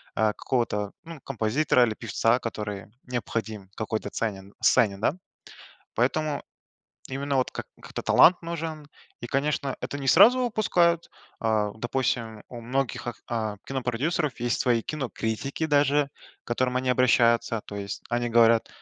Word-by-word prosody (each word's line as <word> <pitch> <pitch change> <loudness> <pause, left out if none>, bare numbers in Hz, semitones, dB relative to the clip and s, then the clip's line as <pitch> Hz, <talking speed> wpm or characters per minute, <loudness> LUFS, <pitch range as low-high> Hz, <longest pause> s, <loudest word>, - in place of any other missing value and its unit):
а, 110 0 +2
какого-то, 105 -6 -1
ну, 165 -2 -9
композитора 120 +3 +2
или 110 - -2
певца, 115 +2 +1
который 105 -5 -5 0.2
необходим 110 -5 -4
какой-то 110 0 -3
ценен 100 -3 -4
сцене, 100 -4 +4
да, 110 +7 +1 0.8
поэтому 145 +5 0 0.7
именно 140 +1 -2
вот 130 - 0
как - - -6 0.2
как-то - - -6
талант 175 +1 +6
нужен. 165 -2 -5 0.4
И, 120 - -5
конечно, 140 +1 -1
это 140 - -4
не 135 - -5
сразу 225 +8 +7
выпускают. 175 -7 +2 0.3
А, 110 -2 +1
допустим, 115 -2 -2
у 120 - -8
многих 125 +1 -2
ак 120 - -3
а, 110 -3 -2
кинопродюсеров 135 +3 -1
есть 120 -1 0
свои 120 -2 +2
кинокритики 135 +1 -3
даже, 145 -1 +3 0.3
к - - -56
которым 125 +1 0
они 130 0 -1
обращаются, 115 -2 +3
то 100 - -8
есть 100 0 -5
они 120 0 0
говорят: 115 -1 +5
120 Hz, 140 wpm, -26 LUFS, 110-140 Hz, 0.8 s, сразу